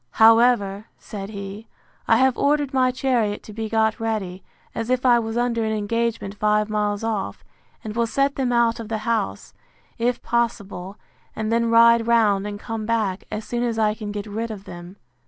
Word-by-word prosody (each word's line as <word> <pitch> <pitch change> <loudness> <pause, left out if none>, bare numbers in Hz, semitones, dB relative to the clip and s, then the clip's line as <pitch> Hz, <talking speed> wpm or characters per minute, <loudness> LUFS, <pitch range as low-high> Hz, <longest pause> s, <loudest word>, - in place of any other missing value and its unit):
However, 225 -3 +4
said 200 -2 -8
he, 200 +1 -8 0.4
I - - +5
have 260 -1 +3
ordered 290 -1 +1
my 255 -1 +3
chariot 250 -5 0
to 215 - -11
be 220 0 -4
got 220 +1 +1
ready, 210 -5 -3 0.3
as 230 +1 -4
if 255 0 0
I 240 -1 +6
was 225 0 -3
under 240 -1 0
an 220 - -1
engagement 215 -1 -2
five 210 +1 +1
miles 210 0 -1
off, 205 - -3 0.4
and 215 -1 -6
will 235 0 +1
set 275 +4 +1
them 260 -2 0
out 235 -1 +2
of 225 -2 -7
the 220 - -1
house, 100 - -2 0.5
if 240 +1 0
possible; 205 -5 -2 0.4
and 220 0 -2
then 230 0 +2
ride 230 0 +5
round, 210 -4 +3
and 205 0 -6
come 220 0 -5
back, 215 -5 -1
as 215 +1 -5
soon 240 0 -3
as 235 -2 -1
I 215 -1 +2
can 210 -1 -6
get 205 0 -5
rid 220 +2 -4
of 210 -3 -7
them. 175 0 -10
225 Hz, 190 wpm, -23 LUFS, 205-235 Hz, 0.5 s, I